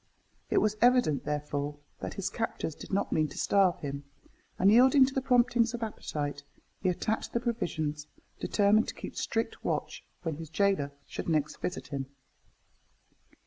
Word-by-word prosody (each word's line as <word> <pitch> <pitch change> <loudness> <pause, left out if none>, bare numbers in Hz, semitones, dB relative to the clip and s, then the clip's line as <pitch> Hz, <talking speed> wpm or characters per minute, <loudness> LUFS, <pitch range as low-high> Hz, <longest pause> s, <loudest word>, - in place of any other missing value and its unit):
It - - +1
was 215 0 +2
evident, 245 - +4
therefore, 145 0 -2 0.2
that - - -5
his 195 - -2
captors 225 -8 -3
did - - -11
not 200 +1 0
mean 155 -1 +2
to - - -11
starve 195 -3 +3
him, 140 -1 -4 0.5
and 195 +2 +5
yielding 260 +4 +7
to 265 - -4
the 265 - 0
promptings 240 -2 +3
of 235 - -4
appetite, 145 -9 -4 0.4
he 185 - +2
attacked 210 +5 -2
the 235 - +2
provisions, 155 -11 -2 0.3
determined 210 +2 +3
to - - -5
keep - - -8
strict 225 0 -2
watch - - -2 0.2
when 160 -4 -2
his 160 -1 -8
gaoler 190 -5 +1
should - - -5
next 155 -2 0
visit 140 -6 -4
him. 135 -2 -3
190 Hz, 160 wpm, -30 LUFS, 150-230 Hz, 0.5 s, yielding